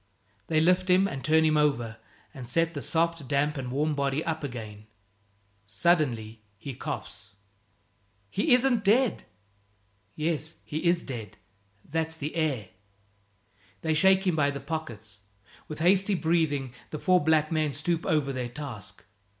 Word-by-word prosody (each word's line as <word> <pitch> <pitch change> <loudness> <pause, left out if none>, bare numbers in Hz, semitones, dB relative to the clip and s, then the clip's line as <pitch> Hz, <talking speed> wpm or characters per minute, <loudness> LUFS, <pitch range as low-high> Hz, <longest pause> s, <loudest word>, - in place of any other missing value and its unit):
They 155 - +2
lift 180 +3 +3
him 185 +2 +5
and 135 -7 -6
turn 160 +1 +4
him 155 -1 +3
over, 120 -7 +1 0.4
and 125 -3 -8
set 165 +6 +1
the 145 - -4
soft, 165 -3 0
damp 145 +3 +1
and 130 -3 -4
warm 150 +3 0
body 140 +1 -1
up 160 -1 -2
again. 110 -5 -7 0.8
Suddenly 115 - +1 0.2
he 135 +6 -7
coughs. 115 - -7 1.0
"He 260 +9 0
isn't 250 -3 +2
dead!" 230 +5 +2 0.9
"Yes, 160 0 -2
he 155 +3 -4
is 170 0 +3
dead; 115 -7 -7 0.5
that's 160 +1 -2
the 150 0 -5
air." 140 - -1 1.1
They 160 - 0
shake 190 +4 +4
him 180 -3 +2
by 145 -2 +2
the 140 0 -4
pockets; 115 -9 -6 0.5
with 155 0 -6
hasty 195 +3 +4
breathing 160 -6 0 0.2
the 155 - -5
four 180 +1 +3
black 155 0 +3
men 155 -2 +1
stoop 165 +4 -1
over 145 -3 +1
their 125 -2 -3
task. 120 -8 -8
155 Hz, 145 wpm, -27 LUFS, 135-165 Hz, 1.1 s, him